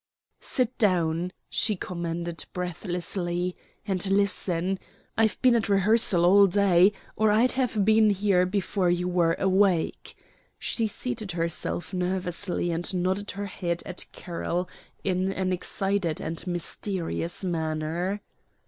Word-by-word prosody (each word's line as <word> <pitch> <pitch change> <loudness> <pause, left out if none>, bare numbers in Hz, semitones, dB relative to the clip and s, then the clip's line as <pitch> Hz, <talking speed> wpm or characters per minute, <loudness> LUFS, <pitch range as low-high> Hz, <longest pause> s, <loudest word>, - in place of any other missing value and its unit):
"Sit 250 -2 0
down," 175 -4 +2 0.2
she 215 -2 +1
commanded 170 -2 -4
breathlessly; 180 0 -2 0.3
"and 190 -3 -1
listen. 195 -2 +1 0.4
I've 220 -1 +2
been 255 -1 +6
at 230 -2 +1
rehearsal 200 -3 +4
all 200 +2 +7
day, 190 0 +4 0.2
or 220 0 +3
I'd 225 +5 +4
have 240 -6 0
been 220 0 +5
here 195 -2 +2
before 190 -1 0
you 175 +1 +1
were 175 -2 +2
awake." 190 -3 +1 0.4
She 225 -2 -1
seated 220 -3 -4
herself 170 +2 -2
nervously 180 0 -1
and 170 +2 -1
nodded 185 +3 -1
her 205 - -2
head 175 -3 -3
at 185 - -6
Carroll 175 +1 -3 0.4
in 185 0 0
an 185 -1 -1
excited 195 -2 -1
and 165 +2 -5
mysterious 175 0 -3
manner. 165 +3 -2
185 Hz, 120 wpm, -26 LUFS, 175-200 Hz, 0.4 s, all